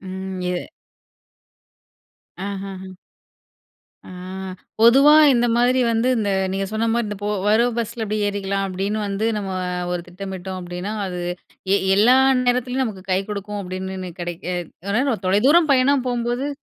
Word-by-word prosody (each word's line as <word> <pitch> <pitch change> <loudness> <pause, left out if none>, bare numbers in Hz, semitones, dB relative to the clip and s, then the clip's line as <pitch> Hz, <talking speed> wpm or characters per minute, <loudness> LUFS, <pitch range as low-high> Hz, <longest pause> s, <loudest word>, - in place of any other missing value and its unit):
ம். 190 0 -6
இது 180 -1 -1 1.9
ஆஹஹ. 190 -1 -7 1.2
ஆ - - -10 0.7
பொதுவா 270 +6 +7 0.2
இந்த 240 -1 +2
மாதிரி 250 +2 +3
வந்து 230 +2 +1
இந்த 205 -3 0 0.2
நீங்க 195 0 -1
சொன்னமாரி, 225 +1 0
இந்த 210 - -4
போ 205 - -1 0.2
வர்ற 220 +3 +4
பஸ்ல 230 0 -3
இப்படி 215 0 -2
ஏறிக்கலாம். 195 -1 -2
அப்பிடின்னு 200 +3 -2
வந்து 200 +2 -1
நம்ம 200 -2 -3 0.4
ஒரு 175 - -1
திட்டமிட்டோம் 190 0 -6
அப்பிடின்னா, 180 +3 -5
அது 180 -1 -5 0.5
எ - - +5 0.2
எல்லா 240 +6 +6 0.3
நேரத்துலயும் 250 +1 +1
நமக்கு 195 -5 -6
கை 185 +1 +2
கொடுக்கும் 205 0 -4
அப்பிடினுன்னு 185 0 -5
,கிடைக்க 175 0 -5 0.4
அ 245 +3 +1
தொலைதூரம் 280 - +4
பயணம் 265 0 +3
போம்போது 245 +3 -1
205 Hz, 130 wpm, -21 LUFS, 190-240 Hz, 1.9 s, பொதுவா